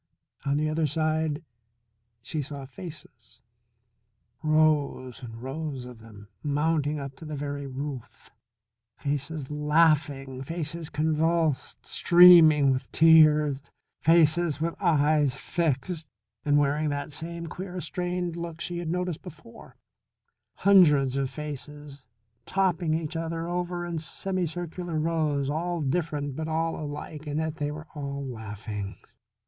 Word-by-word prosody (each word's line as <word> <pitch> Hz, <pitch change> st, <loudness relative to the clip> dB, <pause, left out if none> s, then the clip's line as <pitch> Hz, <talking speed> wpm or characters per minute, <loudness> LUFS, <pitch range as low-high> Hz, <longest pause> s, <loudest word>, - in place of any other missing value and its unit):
On 140 Hz, +1 st, +2 dB
the 155 Hz, +1 st, +1 dB
other 155 Hz, 0 st, +1 dB
side 155 Hz, +1 st, -1 dB, 0.8 s
she 150 Hz, +6 st, -3 dB
saw 140 Hz, -1 st, -7 dB
faces, 135 Hz, -5 st, -11 dB, 1.0 s
rows 150 Hz, -5 st, +1 dB
and 115 Hz, -1 st, -9 dB
rows 135 Hz, -1 st, -4 dB
of 125 Hz, -2 st, -11 dB
them 105 Hz, -2 st, -14 dB
mounting 150 Hz, 0 st, 0 dB
up 135 Hz, -1 st, -7 dB
to -, -, -12 dB
the 155 Hz, -1 st, -5 dB
very 140 Hz, 0 st, -4 dB
roof. 135 Hz, -2 st, -7 dB, 0.7 s
Faces 145 Hz, 0 st, -3 dB
laughing; 150 Hz, -3 st, +2 dB
faces 165 Hz, +2 st, -4 dB
convulsed, 160 Hz, 0 st, 0 dB
streaming 165 Hz, -5 st, +7 dB
with 130 Hz, 0 st, -3 dB
tears; 155 Hz, -3 st, +5 dB, 0.4 s
faces 165 Hz, -1 st, +4 dB
with 165 Hz, +1 st, -1 dB
eyes 150 Hz, -5 st, +3 dB
fixed 160 Hz, +1 st, -2 dB, 0.3 s
and 145 Hz, 0 st, +3 dB
wearing 145 Hz, +1 st, +2 dB
that 145 Hz, +1 st, -3 dB
same 170 Hz, +3 st, -5 dB
queer, 180 Hz, +2 st, -6 dB
strained 180 Hz, 0 st, -3 dB
look 170 Hz, -1 st, -6 dB
she 175 Hz, 0 st, -4 dB
had 170 Hz, -2 st, -4 dB
noticed 180 Hz, -1 st, -2 dB
before; 155 Hz, -7 st, -13 dB, 0.8 s
hundreds 150 Hz, -9 st, +5 dB
of 135 Hz, -1 st, 0 dB
faces 145 Hz, 0 st, -8 dB, 0.5 s
topping 175 Hz, -4 st, +1 dB
each 160 Hz, 0 st, -3 dB
other 165 Hz, 0 st, -3 dB, 0.4 s
in 170 Hz, -2 st, -3 dB
semicircular 175 Hz, 0 st, -3 dB
rows, 155 Hz, -3 st, 0 dB
all 170 Hz, +4 st, -1 dB
different 145 Hz, -2 st, -2 dB
but 160 Hz, +1 st, -4 dB
all 165 Hz, +1 st, 0 dB
alike 150 Hz, 0 st, -7 dB
in 145 Hz, 0 st, -2 dB
that 160 Hz, 0 st, -2 dB
they 145 Hz, 0 st, -1 dB
were 155 Hz, +1 st, -7 dB
all 140 Hz, -2 st, -5 dB
laughing. 105 Hz, -4 st, -6 dB
150 Hz, 120 wpm, -27 LUFS, 140-165 Hz, 1.0 s, streaming